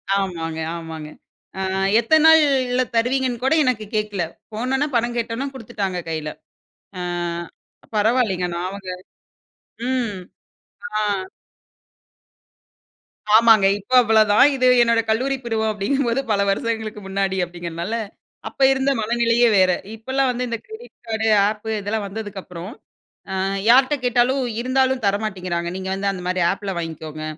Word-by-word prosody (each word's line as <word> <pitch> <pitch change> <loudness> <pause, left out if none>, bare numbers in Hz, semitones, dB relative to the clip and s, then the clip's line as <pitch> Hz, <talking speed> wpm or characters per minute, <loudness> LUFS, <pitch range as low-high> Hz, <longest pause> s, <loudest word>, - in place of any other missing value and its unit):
ஆமாங்க. 165 -5 -3 0.2
ஆமாங்க. 160 -2 -7 0.5
அ - - -2 0.4
எத்தன 310 +7 +3
நாள்ல 270 -6 +4
தருவீங்கன்னு 245 +1 0
கூட 265 - +3
எனக்கு 245 -5 0
கேட்கல. 210 -4 -1 0.3
போனவுன்ன 265 +6 -1
பணம் 240 +1 0
கேட்வுன்ன 235 +4 -2
குடுத்துட்டாங்க 200 -7 -4
கையில. 155 -1 -3 0.7
அ - - -3 0.9
பரவாயில்லங்க! 210 -4 +1
நான் 175 +1 -2
அவங்க 195 -1 -8 1.0
ம், 245 -5 -1 0.8
ஆ. - - +1 2.3
ஆமாங்க. 225 -3 +6
இப்ப 205 - -19
அவ்ளதான். 215 -2 +4
இது 255 -1 +2
என்னோட 230 -1 +3
கல்லூரி 260 +5 +1
பருவம் 220 -2 -1
அப்பிடிங்கும்போது 240 +4 0
பல 200 - +2
வருஷங்களுக்கு 220 0 -2
முன்னாடி 195 0 -1
அப்பிடிங்கிறனால, 175 +3 -5 0.5
அப்போ 275 - -2
இருந்த 265 +1 +1
மனநிலையே 235 +1 +2
வேற. 185 -1 +5 0.2
இப்பல்லாம் 260 +4 0
வந்து 250 0 -3
இந்த 230 - -2
கிரெடிட் 440 +3 -12
கார்டு, 220 0 -1 0.2
அப் 215 +1 -7
இதெல்லாம் 205 +1 -2
வந்ததுக்கப்புறம் 195 -3 -7 0.6
அ - - -2 0.3
யார்ட்ட 260 +3 +6
கேட்டாலும், 250 +2 +2 0.2
இருந்தாலும் 260 0 +1
தர 200 0 +3
மாட்டேங்கிறாங்க. 180 -4 -3
நீங்க 190 0 -5
வந்து 200 +1 -1
அந்தமாரி 180 -1 -2
அப்ல 195 -1 -5
வாங்கிக்கோங்க. 155 -2 -6
220 Hz, 120 wpm, -21 LUFS, 190-250 Hz, 2.3 s, ஆமாங்க